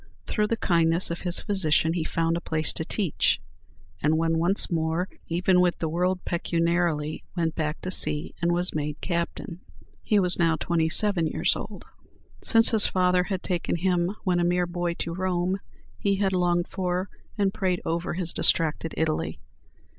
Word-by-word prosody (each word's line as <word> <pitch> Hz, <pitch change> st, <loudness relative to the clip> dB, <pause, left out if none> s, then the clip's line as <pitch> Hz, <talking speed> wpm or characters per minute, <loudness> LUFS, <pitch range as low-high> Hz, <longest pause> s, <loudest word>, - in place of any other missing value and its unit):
Through 210 Hz, -1 st, 0 dB
the 230 Hz, -, -1 dB
kindness 170 Hz, -2 st, +2 dB
of 170 Hz, -, -5 dB
his 175 Hz, -2 st, -2 dB
physician, 165 Hz, -5 st, +1 dB
he 170 Hz, -2 st, -1 dB
found 165 Hz, +1 st, 0 dB
a 170 Hz, -, -3 dB
place 160 Hz, -2 st, -2 dB
to -, -, -3 dB
teach, 180 Hz, -1 st, 0 dB, 0.6 s
and 155 Hz, +2 st, +2 dB
when 165 Hz, 0 st, +1 dB
once 180 Hz, +4 st, +1 dB
more 165 Hz, +2 st, 0 dB, 0.2 s
even 180 Hz, +2 st, +2 dB
with 180 Hz, -1 st, +1 dB
the 165 Hz, -, -2 dB
world 180 Hz, +3 st, -1 dB
pecuniarily, 170 Hz, -3 st, -1 dB
went 165 Hz, -2 st, 0 dB
back 155 Hz, -1 st, -3 dB
to 185 Hz, -, -4 dB
sea, 150 Hz, -3 st, +3 dB
and 170 Hz, 0 st, +2 dB
was 175 Hz, +1 st, +4 dB
made 150 Hz, -1 st, -3 dB
captain. 170 Hz, -1 st, -4 dB, 0.4 s
He 210 Hz, -, +1 dB
was 180 Hz, -1 st, +2 dB
now 165 Hz, -2 st, +3 dB
twenty 165 Hz, 0 st, 0 dB
seven 175 Hz, -1 st, +2 dB
years -, -, +1 dB
old. -, -, -8 dB, 0.6 s
Since 225 Hz, -1 st, +5 dB
his 220 Hz, -2 st, +5 dB
father 180 Hz, -1 st, +2 dB
had 190 Hz, -2 st, -4 dB
taken 175 Hz, -3 st, -2 dB
him 180 Hz, +2 st, 0 dB
when 180 Hz, -3 st, +1 dB
a -, -, +1 dB
mere 175 Hz, +1 st, +1 dB
boy 175 Hz, 0 st, -3 dB
to 170 Hz, -, -4 dB
Rome, 185 Hz, +1 st, -1 dB, 0.4 s
he 200 Hz, -1 st, +1 dB
had 195 Hz, -1 st, 0 dB
longed 175 Hz, -1 st, +1 dB
for 185 Hz, 0 st, -2 dB, 0.3 s
and 200 Hz, -2 st, +1 dB
prayed 190 Hz, -4 st, -1 dB
over 170 Hz, +1 st, -2 dB
his 175 Hz, -2 st, -1 dB
distracted 160 Hz, 0 st, +1 dB
Italy. 160 Hz, -1 st, -1 dB
175 Hz, 175 wpm, -25 LUFS, 165-185 Hz, 0.6 s, Since